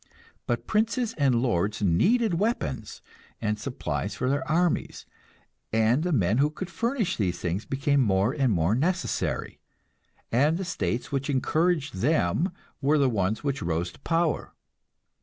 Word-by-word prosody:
But 120 - -1
princes 230 +2 0
and 130 -5 +2
lords 105 -3 0
needed 180 - +3
weapons 165 - -2 0.4
and 105 -1 -1
supplies 100 - -3
for 130 - 0
their 140 - 0
armies, 170 +1 0 0.7
and 115 +5 +3
the 180 +2 -1
men 110 - +2
who 145 +2 +4
could 175 +4 -7
furnish 235 0 -1
these 90 -4 0
things 90 +4 -2
became 140 +1 +1
more 100 +1 +2
and 135 -5 +1
more 85 0 +2
necessary, 175 +9 -1 0.7
and 145 +7 +3
the 190 - -3
states 125 -7 -2
which 140 +1 -2
encouraged 150 - +1
them 145 - +1 0.3
were 145 +2 +3
the 135 -3 +3
ones 105 +2 -1
which 140 -2 -1
rose 85 +1 -1
to - - -18
power. 165 +2 -1
135 Hz, 145 wpm, -26 LUFS, 105-165 Hz, 0.7 s, who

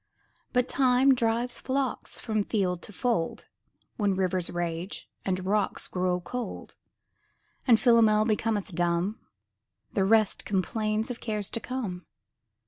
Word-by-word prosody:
But 250 0 +2
Time 260 0 +4
drives 240 0 0
flocks 265 -1 -2
from 215 -3 0
field 185 -5 -1
to - - -9
fold, 220 -6 -1 0.5
When 205 -3 +1
rivers 185 -2 +1
rage 175 +2 -4 0.2
and 185 -1 -1
rocks 205 0 0
grow 180 -1 0
cold; 245 +7 -6 0.9
And 230 -3 +6
Philomel 220 -3 +5
becometh 215 -3 0
dumb; 175 +4 0 0.7
The 195 - +2
rest 215 +1 +3
complains 215 +4 -1
of 240 - -6
cares 210 -3 -2
to - - 0
come. 220 -9 -5
215 Hz, 125 wpm, -28 LUFS, 185-235 Hz, 0.9 s, And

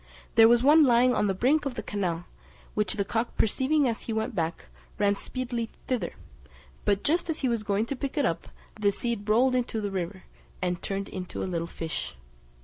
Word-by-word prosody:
There 225 0 +8
was 240 +1 +5
one 305 +3 +7
lying 250 -1 +5
on 210 - +2
the 195 - 0
brink 280 +10 +3
of 275 -4 -3
the - - -4
canal, 175 -4 -2 0.5
which 210 -1 0
the 200 -2 0
cock 225 +4 -2
perceiving 270 +6 +2
as 230 -2 -2
he 225 - -4
went 220 +3 -1
back, 165 -3 -2 0.3
ran 205 -1 +3
speedily 240 0 -4 0.2
thither; 255 -3 -1 0.7
but 205 -1 +2
just 335 +3 +1
as 320 - -2
he 265 - +2
was 235 -3 0
going 210 +1 0
to 275 - -3
pick 275 +3 -4
it 285 - +3
up, 165 - -1 0.3
the 205 -1 +1
seed 225 -1 -3
rolled 250 +4 +4
into 245 -3 0
the 205 -2 -2
river, 185 0 -4 0.4
and 180 -1 -1
turned 195 0 -3
into 185 -2 -5
a - - -1
little 170 -2 -2
fish. 165 - -5
220 Hz, 205 wpm, -28 LUFS, 195-255 Hz, 0.7 s, There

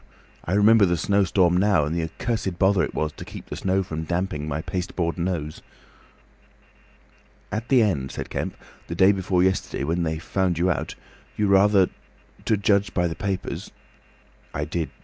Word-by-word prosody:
I 90 - -2
remember 105 0 +6
the 85 0 +1
snowstorm 95 -1 +2
now, 95 -5 +3
and 75 +3 -2
the 85 - 0
accursed 95 +3 -3
bother 95 0 +3
it - - -4
was 75 0 -1
to - - -10
keep - - -10
the - - -7
snow 95 +1 0
from 80 -3 -5
damping 85 -3 -2
my 75 +1 -3
pasteboard 90 -2 -2
nose." 85 -4 -3 1.9
"At 110 +3 -4
the 130 -4 +5
end," 70 -11 0
said - - -6
Kemp, - - -3 0.3
"the - - -4
day 95 +1 +6
before 95 -2 +1
yesterday, 95 -6 0
when 85 +5 0
they 80 -1 -1
found 90 +1 -1
you 90 +2 +2
out, 85 - -3 0.4
you 105 - +1
rather—to 100 +2 +1
judge 100 0 +1
by 90 -1 +2
the 80 - -3
papers—" 95 -2 -4 0.9
"I - - -1
did. 85 -3 -3
95 Hz, 170 wpm, -24 LUFS, 85-100 Hz, 1.9 s, remember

